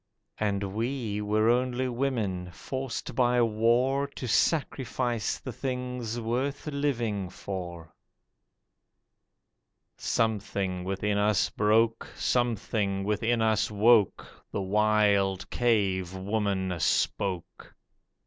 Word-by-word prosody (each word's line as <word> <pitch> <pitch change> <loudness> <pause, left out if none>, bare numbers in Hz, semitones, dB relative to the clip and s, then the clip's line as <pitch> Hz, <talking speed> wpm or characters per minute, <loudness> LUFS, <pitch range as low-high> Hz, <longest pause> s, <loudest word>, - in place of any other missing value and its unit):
And 100 -2 -1
we 115 -2 -2
were 105 +1 +2
only 125 +1 +1
women, 115 -8 -2
forced 130 +6 -5
by 125 0 +3
war 120 +5 +2
To 125 - -5
sacrifice 125 -4 0
the 130 - -7
things 125 -3 -3
worth 125 +5 -2
living 120 - -1
for. 90 -4 -7 2.0
Something 100 -4 -1
within 100 +2 -1
us 105 -1 +2
broke, 110 +2 +2
Something 110 -5 0
within 110 +3 +1
us 110 -2 +2
woke, 105 0 +4 0.3
The 100 - -2
wild 100 -1 +2
cave 95 -6 +1
woman 95 -2 -1
spoke. 90 +2 -1
110 Hz, 90 wpm, -28 LUFS, 100-120 Hz, 2.0 s, woke